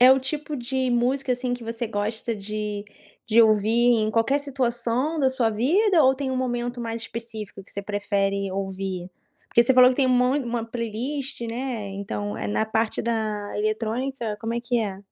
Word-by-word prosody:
é 255 +1 +9
o 265 - +6
tipo 295 +2 -3
de 255 +1 -1
música, 255 +2 +1
assim, 245 0 -1
que 245 - -9
você 230 +1 -3
gosta 220 +2 -2
de 210 0 -4 0.4
de 230 +1 +5
ouvir 215 -2 +4 0.3
em 215 0 +1
qualquer 230 +6 +2
situação 255 +2 -1
da 265 -3 +3
sua 245 -3 +2
vida 325 - +3
ou 265 0 +5
tem 270 -1 -3
um 260 - -1
momento 245 -1 -2
mais 230 0 -3
específico 220 -4 -7
que - - -17
você 200 - -4
prefere 200 -1 -1
ouvir? 190 -1 -4 0.4
Porque 235 - +4
você 265 - +3
falou 255 0 +8
que 255 - -2
tem 270 -2 +3
um - - +1
mon 250 +3 +3
uma 235 -1 -2
playlist, 240 +5 -4
né, 235 -2 -3
então, 200 +1 -4
eh, - - -3
na 210 - +1
parte 220 0 0
da 215 -3 -2
eletrônica 220 +2 -2
como 230 +1 -2
é 235 - -1
que 240 0 0
é? 195 -3 -3
230 Hz, 190 wpm, -25 LUFS, 215-255 Hz, 0.4 s, é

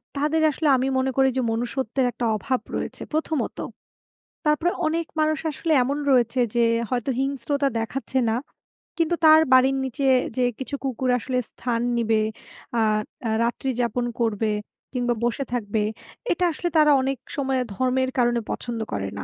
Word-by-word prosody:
তাদের 305 +3 +1
আসলে 305 +2 -1
আমি 260 +2 0
মনে 260 0 +1
করি 265 0 +5
যে - - +2
মনুষ্যত্বের 250 +2 -1
একটা 235 - -3
অভাব 255 +5 -1 0.2
রয়েছে, - - -4
প্রথমত। 315 -1 -1 0.9
তারপরে 310 +4 +2 0.2
অনেক 330 +1 0
মানুষ 310 -1 +2
আসলে 305 +4 -3
এমন 280 +3 -1
রয়েছে 245 0 +3 0.2
যে 235 - +3 0.3
হয়তো 250 +1 -1
হিংস্রতা 275 +1 0
দেখাচ্ছে 265 +3 -3
না। 220 - +1 0.6
কিন্তু 335 +1 +2
তার 315 0 +8
বাড়ির 265 +1 +5
নিচে 265 +2 -2 0.3
যে 255 - +2 0.2
কিছু 265 +2 -4
কুকুর 260 -1 -1
আসলে 255 +2 -2
স্থান 235 -2 -2 0.2
নিবে 225 -1 +2 0.6
আ - - +3 0.5
আ - - 0
রাত্রি 240 +3 -1
যাপন 240 +1 0
করবে 220 -1 +1 0.4
কিংবা 245 -1 +1
বসে 240 +4 0
থাকবে। 215 -3 -1 0.5
এটা 350 - 0
আসলে 345 +2 -3
তারা 300 -1 +6
অনেক 270 +1 -1 0.2
সময় 265 -2 0
ধর্মের 260 +4 +1
কারণে 240 -1 +3
পছন্দ 235 -2 -4
করে 100 -1 -2
না 100 - -4
260 Hz, 155 wpm, -24 LUFS, 240-280 Hz, 0.9 s, তার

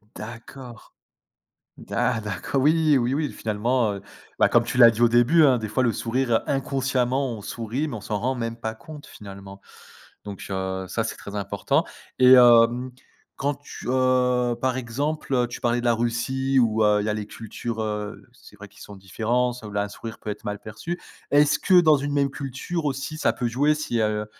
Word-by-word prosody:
D'accord 120 +2 -10 0.8
d'a 120 -1 -1
d'acco 105 +5 -3
oui, 150 0 +3
oui, 120 +2 0
oui, 150 -1 -1
finalement, 110 +1 0
heu, 100 - -8 0.4
bah, - - +5
comme 120 - +3
tu 120 - -4
l'as 120 -2 +9
dit 115 0 -6
au 120 - +6
début 120 +8 +4
hein: 130 -4 +4
«Des 110 -1 -5
fois, 130 +5 0
le 120 - +2
sourire, 120 0 0
inconsciemment, 135 -1 0
on 110 - -8
sourit, 115 +7 -4
mais 145 - -6
on 110 - -6
s'en 105 +1 -3
rend 130 +5 -1
même 115 -2 -4
pas 110 -1 -5
compte 150 +5 -12
finalement» 100 -1 -11 0.7
donc 100 -2 -8
heu, 95 -1 -3
ça, 115 +5 -2
c'est - - -4
très 100 0 -9
important 100 -2 0 0.4
et 130 0 +8
hem, 120 0 +6 0.5
quand 140 +1 -1
tu, 145 -2 -11
heu, 125 -1 +2
par 130 -1 0
exemple, 130 0 -1
tu - - -8
parlais 120 0 +1
de 120 - -6
la 120 - +4
Russie 120 +4 0
où, 110 -2 +2
heu, 105 0 +3
il - - -4
y - - -1
a - - 0
les 105 -1 -4
cultures, 115 +1 -6
heu, 105 -1 -4
c'est 120 -4 -17
vrai 105 0 -11
qu'ils - - -18
sont 105 - -10
différents, 115 +6 -1
ça 120 -3 -10
où - - -9
la 100 0 0
un 100 - -6
sourire 115 +2 -9
peut 110 - -7
être 105 - -6
mal 105 0 -4
perçu. 165 - -6 0.3
Est-ce 145 0 +4
que 185 -1 +5
dans 155 -3 +5
une 145 +1 -3
même 140 -1 +2
culture 140 +5 -5
aussi, 140 +3 -3
ça - - +2
peut 120 - -3
jouer 145 +6 +2
si, 135 -6 -2
heu, 105 0 -1
120 Hz, 205 wpm, -24 LUFS, 110-135 Hz, 0.8 s, l'as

